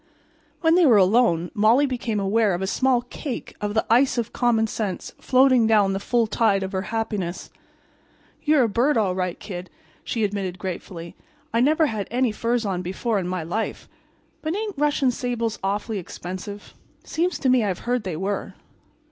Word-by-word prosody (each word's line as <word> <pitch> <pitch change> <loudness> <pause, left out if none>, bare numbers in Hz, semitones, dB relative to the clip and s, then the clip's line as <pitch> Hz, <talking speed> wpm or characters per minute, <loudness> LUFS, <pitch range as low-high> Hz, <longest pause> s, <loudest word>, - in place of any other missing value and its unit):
When 325 -1 +4
they 350 -2 +5
were 230 -5 +6
alone 185 -4 +3
Molly 225 +7 +4
became 240 -5 -2
aware 200 0 +2
of 180 - -3
a - - +1
small 250 +4 +2
cake 255 +2 -6
of 210 0 -2
the 220 - +2
ice 250 +3 +3
of 235 -1 -2
common 235 -3 +2
sense 210 -3 -4
floating 255 -3 +4
down 205 -3 +4
the 195 - -2
full 235 +3 +1
tide 210 -2 +1
of 190 - -4
her 190 -2 -1
happiness. 210 -5 -3 0.9
"You're 300 -3 +4
a - - +3
bird, 240 +6 +2
all 200 -4 +2
right, 180 -1 -2
Kid," 180 -3 -7 0.3
she 225 - -2
admitted 195 -3 -2
gratefully. 175 -2 -6 0.4
"I 230 - +2
never 310 +5 +4
had 215 -8 -3
any 245 0 +1
furs 230 +2 -1
on 185 -3 -1
before 200 +4 -1
in 180 - -3
my 180 -2 -2
life. 215 +8 -3 0.5
But 315 +3 -2
ain't 420 -2 -3
Russian 290 -3 +2
sables 235 -2 -2
awful 205 +3 -1
expensive? 185 +2 -7 0.3
Seems 350 +3 -1
to 270 - -1
me 250 -2 +4
I've 190 -4 -3
heard 245 0 +1
they 180 -5 -4
were." 195 +3 -3
220 Hz, 180 wpm, -23 LUFS, 195-250 Hz, 0.9 s, were